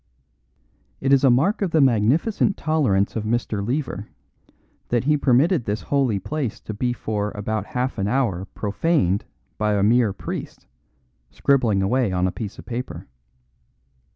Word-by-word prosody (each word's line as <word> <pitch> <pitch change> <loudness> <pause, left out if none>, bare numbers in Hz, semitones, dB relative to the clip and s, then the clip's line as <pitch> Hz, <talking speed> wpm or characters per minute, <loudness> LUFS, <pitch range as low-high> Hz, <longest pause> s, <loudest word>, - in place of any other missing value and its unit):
It 135 0 +2
is 135 - +4
a 135 - +6
mark 145 - +2
of 195 - +1
the 160 - +2
magnificent 135 - +2
tolerance 130 -12 +1
of 110 - -2
Mr. 110 -2 -1
Lever 120 -4 -3 0.8
that 120 0 +1
he 150 +3 +3
permitted 140 +2 +3
this 105 +1 -2
holy 135 -7 +1
place 130 0 -3
to 110 - -6
be 120 +4 -1
for 105 -3 -2
about 105 0 -3
half 125 -2 -2
an 100 - 0
hour 105 -7 0
profaned 105 - 0 0.3
by 105 -1 +1
a 100 - +1
mere 115 0 +4
priest, 95 - -7 0.6
scribbling 120 -8 +2
away 120 +1 +1
on 90 0 +1
a 95 - +1
piece 105 0 -6
of - - -11
paper. 125 +2 -5
120 Hz, 155 wpm, -23 LUFS, 105-135 Hz, 0.8 s, a